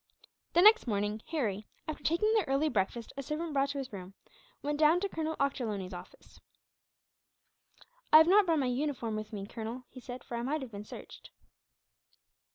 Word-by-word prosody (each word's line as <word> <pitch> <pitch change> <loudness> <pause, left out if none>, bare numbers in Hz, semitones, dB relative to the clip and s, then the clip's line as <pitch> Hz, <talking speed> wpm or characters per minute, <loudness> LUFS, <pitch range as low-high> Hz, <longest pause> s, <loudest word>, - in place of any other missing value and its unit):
The 345 - +5
next 430 - +7
morning 210 0 -1
Harry, 215 - -2 0.2
after 310 - -5
taking 385 +7 +2
the 435 -3 +3
early 275 +3 +2
breakfast 220 +1 -2
a - - -2
servant 305 +3 -4
brought 275 0 +2
to 280 - -4
his 265 -4 -5
room, 190 0 -8 0.5
went 295 +1 -2
down 315 +3 +5
to 400 - 0
Colonel 320 -3 -3
Ochterlony's 215 -9 -2
office. 180 +1 -12 1.7
"I 310 - +11
have 320 +1 +7
not 395 +1 +6
brought 330 -1 +3
my 275 - +1
uniform 250 -3 -1
with 215 0 -5
me, 200 -2 -5
Colonel," 230 +3 -6
he 255 - -10
said, 250 0 -8
"for 235 - -5
I - - -2
might 280 +4 -1
have 250 - -9
been 205 0 -8
searched." - - -11
270 Hz, 180 wpm, -31 LUFS, 215-310 Hz, 1.7 s, I